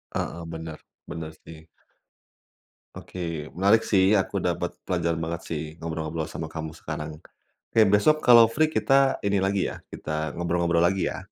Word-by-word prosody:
Heeh 85 0 -3
bener, 80 -1 -7 0.3
bener 80 -1 -6
sih. 80 0 -12 1.3
Oke, 85 -4 -6
menarik 100 +5 +4
sih. 95 -3 +4 0.2
Aku 95 - -2
dapet - - -2
pelajaran 85 -1 -1
banget 85 +1 -4
sih 80 -3 -3 0.2
ngobrol-ngobrol 80 -1 -4
sama 80 - -6
kamu 80 -1 -5
sekarang, 75 0 -5 0.6
oke 115 - +4
besok 105 +10 +4
kalau 120 -2 +8
free 155 +8 +1
kita 135 -3 +3
ini 100 0 +2
lagi 95 0 +1
ya - - -7
kita - - -8 0.3
ngobrol-ngobrol 85 0 +1
lagi 95 +1 +1
ya? - - -6
85 Hz, 150 wpm, -25 LUFS, 80-100 Hz, 1.3 s, kalau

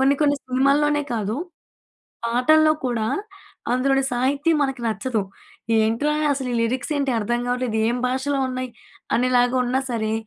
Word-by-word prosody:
కొన్ని 275 +1 +4
కొన్ని 285 -1 +3
సినిమాల్లోనే 285 +3 +2
కాదు, 215 +1 -2 0.9
పాటల్లో 310 +7 +4
కూడా 230 -3 -1 0.7
అందులోని 270 +2 +2
సాహిత్యం 280 +6 +1
మనకి 270 -3 -1
నచ్చదు. 225 0 -1 0.6
"ఏంట్రా 230 +7 +1 0.2
అసలీ 260 -3 -3
లిరిక్సేంటి 260 +4 -1
అర్థం 240 +3 -1
గావట్లేదు, 245 -3 -1
ఏం 240 - 0
భాషలో 265 +2 -1
ఉన్నాయి" 255 0 -3 0.5
అనేలాగా 250 0 +2
ఉన్నా 255 +2 0
సరే, 220 -2 -1
255 Hz, 125 wpm, -22 LUFS, 240-275 Hz, 0.9 s, కొన్ని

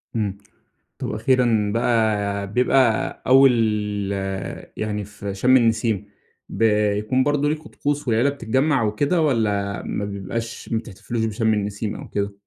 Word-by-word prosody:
إمم، 100 -3 -1 0.6
طب - - -4
أخيرًا 115 -2 +2
بقى 105 -4 +1
بيبقى 125 -1 +2
أول 135 0 +7 1.2
يعني 105 -1 -3
في 100 -1 -7
شم 125 +6 +4
النسيم، 110 -4 +1 0.4
بيكون 105 +3 +1
برضو 145 0 +1
ليكم 155 0 -4
طقوس 145 -2 -2
والعيلة 120 +5 +3
بتتجمع 135 +1 +1
وكده؟ 145 +11 +1
والّا 105 -7 0
ما 100 - -3
بيبقاش 100 +4 -5
ما 115 - +2
بتحتفلوش 110 +1 -4
بشم 110 0 +1
النسيم 105 +1 -3
أو - - -9
كده؟ 100 0 -2
110 Hz, 125 wpm, -22 LUFS, 105-130 Hz, 1.2 s, أول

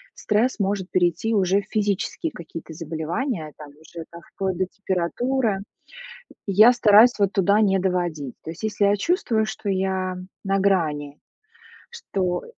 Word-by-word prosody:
стресс 225 +4 0
может 195 -2 -1
перейти 175 +5 +1
уже 195 0 +2
в - - -17
физические 210 - -1
какие-то 165 - -9
заболевания, 165 - -4
там, 150 -1 -11
уже, 160 +3 -11
там, 170 0 -11
вплоть 190 -2 -2
до 185 - +1
температуры. 205 +5 -1 0.9
И 195 - -1
я 215 +5 +8
стараюсь 235 0 +6
вот 200 -1 +2
туда 200 +1 +3
не 195 -2 +3
доводить. 175 -8 -2
То 160 - -6
есть, 170 - -12
если 210 -1 0
я 200 +1 +4
чувствую, 225 - 0
что 215 - -7
я 190 -1 -1 0.3
на 195 0 +1
грани, 155 -7 0 0.7
что 185 - -3
190 Hz, 150 wpm, -23 LUFS, 170-210 Hz, 0.9 s, я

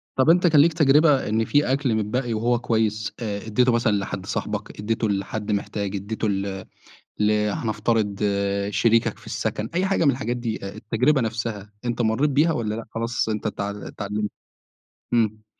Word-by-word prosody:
طَب 130 +4 +3
أنت 175 +2 +5
كان 155 -3 +6
ليك 165 +2 +4
تجربة 150 -4 +4
إن 110 +1 +1
في 145 0 +2
أكل 135 -4 +1
متبقّي 115 +3 -1
وهو 120 +2 +1
كويس، 110 -3 0
آآ 105 -3 -4
إدّيته 125 +3 +3
مثلًا 115 -2 +2
لحد 95 -1 -4
صاحبك، - - -4
إدّيته 110 +1 -1
لحد 105 +2 -2
محتاج، 100 0 -2
إدّيته 105 +3 -3
ل 95 -1 -3 0.5
ل 105 0 +3 0.2
هنفترض 105 -2 -1 0.5
شريكك 115 +3 +2
في - - -18
السَكَن، 105 +1 -3
أي 185 +2 +1
حاجة 195 -3 +1
من 140 - +6
الحاجات 120 -1 -2
دي، 115 -2 -3
آآ، 95 - -7
التجربة 125 +7 +1
نفسها، 110 -3 -3
أنت 120 0 -1
مرّيت 115 +7 +2
بيها 155 +4 +3
والّا 110 -6 -2
لأ 115 - -5
خلاص 115 0 -2
أنت 110 0 -2
اتعل 100 -1 -4
اتعلمت؟ 105 0 -4 0.8
إمم. 110 -2 +1
110 Hz, 170 wpm, -24 LUFS, 105-125 Hz, 0.8 s, كان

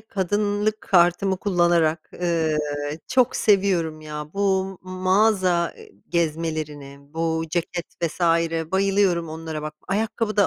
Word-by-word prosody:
kadınlık 205 +1 -1
kartımı 180 +1 +3
kullanarak, 175 -4 +1
ııı, 165 -3 0 0.5
çok 255 -2 +2
seviyorum 185 -6 +2
ya. 150 0 -7
Bu 195 -1 0
mağaza, 185 -1 +2
eee, - - -15 0.2
gezmelerine, 155 -4 -2
bu 160 +3 -2
ceket 175 +1 -2 0.2
vs. 170 +2 -2 0.5
bayılıyorum 190 -3 +2
onlara 160 -1 -5
bak. 155 0 -5
Ayakkabı 215 +2 -1
da 200 -2 +5
175 Hz, 110 wpm, -23 LUFS, 160-195 Hz, 0.5 s, da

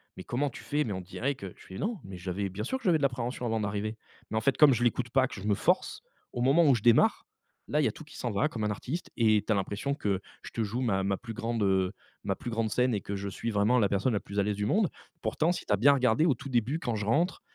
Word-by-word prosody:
mais 95 - -8
comment 135 +3 -1
tu - - -10
fais»? 150 +1 0
Mais 110 - -3
on 95 - -4
dirait 115 +10 -2
que 100 -9 -9
je - - -16
fais: 95 - -9
«Non, 220 0 -1
mais 95 -1 -8
j'avais 95 +2 -3
bien 100 +3 -5
sûr 260 - -1
que - - -17
j'avais 170 -4 +3
de - - -6
l'appréhension 125 -2 -1
avant 115 0 0
d'arriver», 105 +1 -2 0.3
mais 110 - -2
en - - +1
fait, 140 +2 +1
comme 150 -3 +7
je 120 - -1
l'écoute 120 0 +1
pas 130 +1 +3
que, - - -11
je 105 - -4
me 100 - +3
force. - - 0 0.3
Au 120 - -3
moment 140 +7 +5
où 135 - +6
je 105 - -4
démarre, 120 -1 +4 0.4
là, 150 - +1
il - - +2
y - - +4
a - - 0
tout - - -11
qui 150 - -15
s'en 120 - -3
va, 105 +9 +2
comme 115 -8 -5
un 105 - +1
artiste 130 - -4
et 110 -3 +4
tu - - -1
as - - +4
l'impression 100 +8 -2
que 100 -9 -1 0.2
je - - -9
te 115 - -3
joue 110 +4 -3
ma 100 -6 +1
ma 95 0 0
plus 115 +2 -8
grande, 115 0 -2
heu, 95 -1 +2 0.3
ma 100 -1 -1
plus 120 +3 -6
grande 115 -1 0
scène 125 +2 +2
et 100 - -1
que 100 - -4
je 100 0 -4
suis 115 +4 -4
vraiment 110 +3 +3
la 100 -4 +3
personne 100 +5 +1
la 105 - +1
plus 100 +1 -5
à 100 - +4
l'aise 105 0 -1
du 105 +1 -1
monde. 200 - +2 0.3
Pourtant 160 +2 +1
si 175 - -4
tu 105 - +1
as - - +3
bien 140 +6 +6
regardé 130 +3 +3
au 140 - +3
tout 130 - -9
début, 125 +4 +1
quand 120 -7 -2
je 105 - -3
rentre 165 - +1
115 Hz, 310 wpm, -29 LUFS, 100-135 Hz, 0.4 s, comme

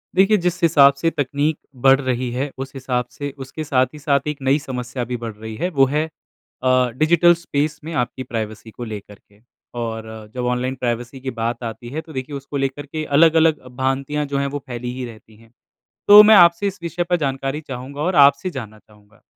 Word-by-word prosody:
देखिए, 195 +3 +5
जिस 180 0 -2
हिसाब 145 -4 +6
से 150 +4 0
तकनीक 145 +1 -1 0.3
बढ़ 135 +1 +7
रही 130 -1 -1
है, 130 +4 -2
उस 135 0 -6
हिसाब 125 -2 -2
से 145 -1 -6
उसके 135 +4 -7
साथ 130 -4 +2
ही 150 - -10
साथ 140 -1 0
एक 150 -1 -2
नई 135 +2 +2
समस्या 125 -3 -5
भी 125 +1 -4
बढ़ 115 -1 -6
रही 110 +1 -8
है, 175 +11 -2
वो 140 -6 +4
है 150 +4 0 0.6
अ, 130 -1 +3
डिजिटल 170 +3 +5
स्पेस 150 -2 -2
में 165 +2 -6
आपकी 125 -2 -2
प्राइवेसी 110 -2 -5
को 120 - -8
लेकर 105 -2 -8
के। 100 +1 -28 0.4
और 115 -1 -4 0.3
जब 125 -1 -2
ऑनलाइन 125 +1 -1
प्राइवेसी 120 0 -3
की 130 0 -4
बात 115 +1 -3
आती 115 +1 -6
है, 155 +5 -4
तो 160 0 -14
देखिए, 130 +2 -5
उसको 140 +1 -6
लेकर 135 +1 -2
के 155 +2 -5
अलग-अलग 160 -1 +4
भ्रांतियाँ 135 +3 -1
जो 140 -1 -3
हैं, 140 0 0
वो 145 +1 -4
फैली 120 -1 -5
ही 130 0 -5
रहती 110 -2 -13
हैं। 115 +1 -21 0.6
तो 205 +1 +11
मैं 215 +1 +7
आपसे 170 +1 +6
इस 200 0 -5
विषय 170 +1 -2
पर 180 - +3
जानकारी 135 -1 -2
चाहूँगा 135 0 -7
और 180 +4 0
आपसे 140 +4 +5
जानना 110 - -8
चाहूँगा 105 0 -24
135 Hz, 210 wpm, -20 LUFS, 125-150 Hz, 0.6 s, तो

